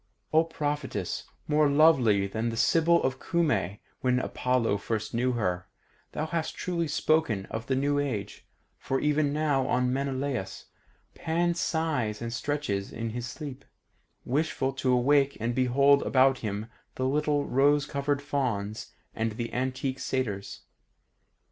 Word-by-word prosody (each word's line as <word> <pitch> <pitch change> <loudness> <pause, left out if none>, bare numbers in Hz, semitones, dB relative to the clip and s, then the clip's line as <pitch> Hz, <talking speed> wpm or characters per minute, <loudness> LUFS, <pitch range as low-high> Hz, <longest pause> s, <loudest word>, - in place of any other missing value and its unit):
O 160 +1 +6
Prophetess 145 - -3 0.2
more 150 -1 +3
lovely 135 -10 +5
than 110 +4 -2
the 115 - -4
Sybil 170 +7 +4
of 130 0 -1
Cumae 125 - 0 0.2
when 125 -1 +2
Apollo 125 -4 0
first 110 0 -3
knew 125 +2 +1
her, 90 -6 -1 0.5
thou 155 - -2
hast 160 0 -3
truly 170 -2 -2
spoken 150 -9 +1
of 110 +1 -5
the 130 - +1
new 145 +2 +1
age, 110 -8 -4 0.3
for 135 - -1
even 150 -1 +2
now 145 -3 +1
on 125 0 +1
Maenalus, 135 -7 -3 0.5
Pan 170 +2 0
sighs 160 -11 -1
and 115 0 -4
stretches 120 -8 -2
in 115 0 -4
his 120 +1 -4
sleep, 140 -1 -7 0.6
wishful 135 -1 0
to 130 -1 0
awake 135 +3 +3
and 115 +2 -1
behold 140 +3 +4
about 135 -1 +3
him 105 -1 -3 0.3
the 130 - -1
little 145 +1 +1
rose 140 +2 +3
crowned 140 -1 -1
Fauns 115 -7 -2 0.2
and 115 -1 -1
the 115 +1 -5
antique 130 +1 -2
Satyrs. 110 -7 -3
130 Hz, 140 wpm, -28 LUFS, 115-145 Hz, 0.6 s, O